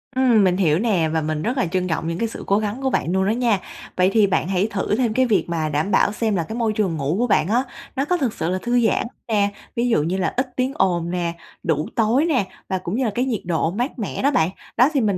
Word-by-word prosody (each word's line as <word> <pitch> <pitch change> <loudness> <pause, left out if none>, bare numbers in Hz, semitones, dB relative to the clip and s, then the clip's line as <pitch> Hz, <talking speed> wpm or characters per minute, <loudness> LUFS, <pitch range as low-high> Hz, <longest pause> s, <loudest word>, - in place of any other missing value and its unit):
Ừm, 250 -5 +4
mình 180 -1 +2
hiểu 165 -4 +2
nè 190 -8 +1
và 160 - +1
mình 155 0 -2
rất 245 - -1
là 255 - +2
trân 180 +1 -1
trọng 165 -1 -2
những 165 0 -2
cái 230 - 0
sự 225 - -8
cố 200 +1 +3
gắng 215 +4 -3
của 265 - +1
bạn 175 - 0
luôn 190 +1 +1
đó - - +1
nha! 230 -3 +1 0.4
Vậy 185 +1 +3
thì 215 -3 +5
bạn 190 -3 0
hãy 190 +2 +1
thử 200 +1 0
thêm 235 -2 +1
cái 260 +3 +3
việc 200 -8 +1
mà 160 -2 -1
đảm 150 +7 -1
bảo - - +3
xem 215 0 -1
là 170 - 0
cái 220 +8 -6
môi 225 -3 +1
trường 195 -6 0
ngủ 145 +2 -1
của 245 - +2
bạn 190 - +2
á 235 +5 +2 0.3
nó 270 +1 0
có 360 +4 +1
thực 260 -9 -1
sự 165 -6 -2
là 185 +1 -1
thư 240 -1 +2
giãn - - 0 0.2
nè, 205 -3 +2 0.3
ví 240 +1 +1
dụ 190 -10 +2
như 175 +4 -1
là 190 - -1
ít 255 +1 +1
tiếng 255 +1 0
ồn 175 - +1
nè, 175 -2 -1 0.3
đủ 155 -2 0
tối 235 +7 +3
nè, 270 - +1 0.2
và 190 - 0
cũng 180 +1 -4
như 260 +2 0
là 220 - 0
cái 250 - +1
nhiệt 240 -6 -2
độ 165 -1 0
mát 245 - -3
mẻ 210 - -3
đó 280 - +3
bạn. 165 - +2 0.3
Đó 250 +4 +6
thì 275 - +2
mình 205 -4 +1
205 Hz, 290 wpm, -22 LUFS, 175-240 Hz, 0.4 s, Đó